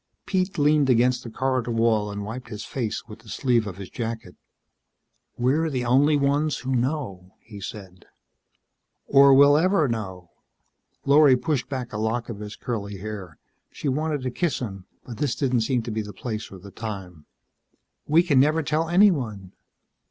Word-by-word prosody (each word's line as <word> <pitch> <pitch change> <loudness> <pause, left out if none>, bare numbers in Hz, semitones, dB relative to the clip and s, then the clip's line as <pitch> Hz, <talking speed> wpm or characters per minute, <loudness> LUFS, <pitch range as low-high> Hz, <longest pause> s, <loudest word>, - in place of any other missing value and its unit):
Pete 190 0 -1
leaned 145 -1 +3
against 125 +1 +3
the 115 - -7
corridor 130 0 -1
wall 115 -2 +1
and 100 0 -5
wiped 120 +4 -7
his 105 -2 -7
face 120 -5 -4
with 110 -1 -11
the 115 -1 -16
sleeve 120 -3 +1
of 95 -2 -7
his 95 -2 -9
jacket. 115 -1 -5 1.0
"We're 145 +7 +1
the 130 -4 -2
only 140 +5 +4
ones 145 +2 +1
who 130 +1 -3
know," 120 - -3
he 105 -3 -12
said. 95 -2 -9 1.0
"Or 140 0 +6 0.3
ever 185 +1 +3
will 140 - +1
know." 95 -6 -6 0.7
Lorry 140 -2 +6
pushed 140 -2 -2
back 130 -3 -5
a 105 - -3
lock 115 +2 -2
of 105 -3 -6
his 105 0 -7
curly 100 -4 -5
hair. 95 -5 -7 0.3
She 145 - -3
wanted 150 0 -1
to 130 - -2
kiss 165 +2 -1
him, 95 -6 -6 0.2
but 120 -3 -8
this 145 -5 0
didn't 125 -4 +1
seem 120 +1 0
to 115 - -5
be 110 0 -2
the 105 -1 -8
place 110 +2 -5
or 95 - -9
the 100 +2 -12
time. 95 -8 -7 0.8
"We 160 +3 +5
can 145 -7 +3
never 155 +4 +3
tell 155 +3 0
anyone." 135 - +2
120 Hz, 175 wpm, -24 LUFS, 105-140 Hz, 1.0 s, Or